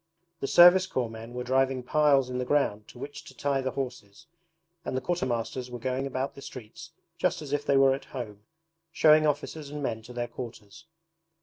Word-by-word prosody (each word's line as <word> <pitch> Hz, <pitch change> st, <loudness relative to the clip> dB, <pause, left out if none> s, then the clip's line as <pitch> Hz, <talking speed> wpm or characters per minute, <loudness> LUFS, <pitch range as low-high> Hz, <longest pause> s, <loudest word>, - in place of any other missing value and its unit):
The 135 Hz, -, -2 dB
Service 180 Hz, +3 st, +7 dB
Corps 120 Hz, -3 st, -2 dB
men 115 Hz, +2 st, -9 dB
were 125 Hz, -, -3 dB
driving 130 Hz, 0 st, +1 dB
piles 140 Hz, -1 st, +3 dB
in 125 Hz, 0 st, -3 dB
the -, -, 0 dB
ground 125 Hz, -7 st, 0 dB
to -, -, -14 dB
which 145 Hz, +3 st, -8 dB
to 130 Hz, -, -14 dB
tie 140 Hz, -1 st, 0 dB
the 130 Hz, -, -1 dB
horses, 125 Hz, -7 st, -6 dB, 0.6 s
and 130 Hz, -, -3 dB
the -, -, -1 dB
quartermasters 125 Hz, -7 st, -2 dB
were 125 Hz, -, -6 dB
going 130 Hz, +3 st, -2 dB
about 135 Hz, 0 st, -3 dB
the 140 Hz, -, -12 dB
streets 120 Hz, -5 st, -10 dB, 0.3 s
just -, -, +1 dB
as 145 Hz, -1 st, -6 dB
if 145 Hz, 0 st, 0 dB
they 140 Hz, -, +3 dB
were 135 Hz, 0 st, +6 dB
at 135 Hz, -, -5 dB
home, 110 Hz, -6 st, -7 dB, 0.5 s
showing 155 Hz, -1 st, +5 dB
officers 150 Hz, 0 st, -2 dB
and 145 Hz, 0 st, -6 dB
men 115 Hz, -4 st, -2 dB
to 115 Hz, +3 st, -12 dB
their 120 Hz, -1 st, -3 dB
quarters. 115 Hz, +4 st, -10 dB
130 Hz, 200 wpm, -28 LUFS, 120-145 Hz, 0.6 s, Service